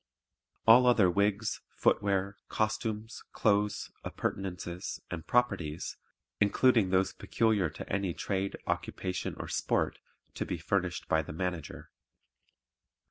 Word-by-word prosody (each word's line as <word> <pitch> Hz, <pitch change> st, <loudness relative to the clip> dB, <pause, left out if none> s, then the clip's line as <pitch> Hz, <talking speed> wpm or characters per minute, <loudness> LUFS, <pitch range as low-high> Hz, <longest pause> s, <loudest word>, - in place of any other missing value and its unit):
All 120 Hz, +3 st, +8 dB
other 105 Hz, -7 st, +5 dB
wigs, 100 Hz, +3 st, +1 dB
footwear, 100 Hz, -1 st, +1 dB
costumes, 110 Hz, 0 st, -2 dB
clothes, 105 Hz, 0 st, +1 dB
appurtenances 90 Hz, -2 st, -4 dB
and 80 Hz, -3 st, -5 dB
"properties," 100 Hz, -11 st, 0 dB, 0.4 s
including 105 Hz, 0 st, +4 dB
those 95 Hz, +1 st, +2 dB
peculiar 110 Hz, -6 st, +1 dB
to 75 Hz, -, -8 dB
any 95 Hz, -3 st, -1 dB
trade, 95 Hz, 0 st, -2 dB
occupation 90 Hz, -1 st, -2 dB
or -, -, -5 dB
sport, -, -, 0 dB, 0.3 s
to -, -, -2 dB
be 90 Hz, -, -3 dB
furnished 90 Hz, +1 st, -1 dB
by 80 Hz, -, +3 dB
the 75 Hz, -, -8 dB
Manager. 90 Hz, 0 st, -4 dB
100 Hz, 110 wpm, -31 LUFS, 90-110 Hz, 0.4 s, All